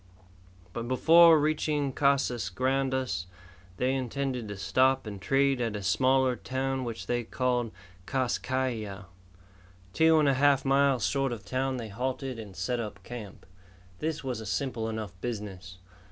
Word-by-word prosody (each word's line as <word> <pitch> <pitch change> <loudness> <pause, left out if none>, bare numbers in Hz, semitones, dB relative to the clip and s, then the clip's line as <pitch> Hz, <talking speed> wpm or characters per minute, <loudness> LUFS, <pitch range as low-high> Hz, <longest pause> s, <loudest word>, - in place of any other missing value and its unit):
But 115 0 -4
before 165 +6 +7
reaching 150 -2 0
Casas 130 -8 +1
Grandes 130 -4 -1 0.5
they 130 +1 +1
intended 130 -2 -2
to 100 -1 -6
stop 130 +8 +2
and 100 -3 -7
trade 135 +3 +2
at 115 -3 -1
a 100 - -5
smaller 130 +5 +3
town 130 +1 -2
which 115 -2 -5
they 120 0 -1
called 125 0 -1 0.4
Kas 130 -3 0
Kai 130 0 -1
Ya. 105 -4 -6 0.9
Two 160 0 +5
and 150 -2 +4
a 140 - +4
half 140 +1 +3
miles 135 -3 +3
short 135 -2 0
of 110 -4 -6
town 130 0 -1
they 115 -3 -6
halted 130 +3 -3
and 100 -4 -9
set 110 +7 -2
up 110 -3 -6
camp. 110 -6 -9 0.5
This 155 -1 -3
was 125 -4 -3
a - - -7
simple 115 -1 -2
enough 110 -3 -4
business. 95 -6 -6
130 Hz, 155 wpm, -28 LUFS, 110-135 Hz, 0.9 s, before